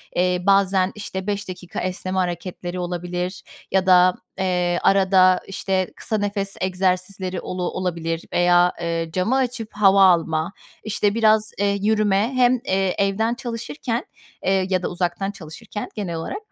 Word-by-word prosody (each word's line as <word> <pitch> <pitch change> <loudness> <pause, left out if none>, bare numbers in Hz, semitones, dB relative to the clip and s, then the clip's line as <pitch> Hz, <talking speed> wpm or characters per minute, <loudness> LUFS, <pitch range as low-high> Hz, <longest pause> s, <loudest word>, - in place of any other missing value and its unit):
eee, 180 0 +1
bazen, 195 -1 +3
işte, 190 -2 -6
5 200 -1 -2
dakika 180 -1 -6
esneme 185 0 -3
hareketleri 180 0 -3
olabilir 180 +1 -4 0.3
ya 190 0 +2
da, 180 -1 +6 0.3
eee, 180 -2 +1
arada, 190 -1 +4
işte, 190 -1 -1
kısa 220 - -2
nefes 200 -1 -2
egzersizleri 185 0 -1
olu 180 0 -4
olabilir 170 -2 -3
veya, 175 0 +4
eee, 165 -1 -2
camı 190 +8 +1
açıp 250 -4 -1
hava 195 -1 +5
alma, 165 -1 +3 0.3
işte, 205 -1 0
biraz, 220 -1 +3
eee, 200 0 +1
yürüme, 215 +2 +2
hem, 250 -1 +4
eee, 190 -1 0
evden 200 +3 +1
çalışırken, 235 0 -4 0.4
eee, 190 0 +2
ya 185 -1 0
da - - 0
uzaktan 180 +3 -2
çalışırken 200 +4 -8
genel 195 -6 -3
olarak, 165 - -4
190 Hz, 140 wpm, -22 LUFS, 180-205 Hz, 0.4 s, da